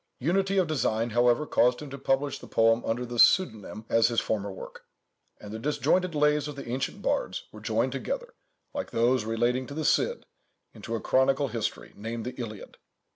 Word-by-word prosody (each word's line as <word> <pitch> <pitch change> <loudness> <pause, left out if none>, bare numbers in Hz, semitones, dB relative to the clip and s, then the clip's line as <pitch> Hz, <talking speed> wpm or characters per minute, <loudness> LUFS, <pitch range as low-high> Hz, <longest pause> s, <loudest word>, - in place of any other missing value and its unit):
Unity 190 +7 +1
of 185 - +4
design, 120 -7 0
however, 120 +5 +3
caused 125 -3 +3
him 150 -2 -8
to 140 - -6
publish 135 +1 0
the - - -11
poem 115 +1 +3
under 120 +2 -1
the 120 -1 -5
same 185 +9 +7 0.2
pseudonyme 105 +2 -9
as 115 -1 +4
his 120 -2 +1
former 100 -2 -2
work: 95 - -10 0.6
and 105 - -10
the 110 - -5
disjointed 165 +6 +1
lays 150 0 +2
of 150 - -6
the 140 - -8
ancient 125 +3 -3
bards - - -1
were - - -12
joined - - 0
together, - - -4 0.4
like 285 -1 -4
those 120 0 +2
relating 120 +3 0
to 140 - -8
the 155 -1 -2
Cid, - - +1 0.5
into 115 0 -5
a 115 - -3
chronicle 135 +1 +2
history, 110 -1 -4
named 115 +2 -5
the 125 - -4
Iliad. 110 -3 -8
125 Hz, 190 wpm, -28 LUFS, 115-150 Hz, 0.6 s, same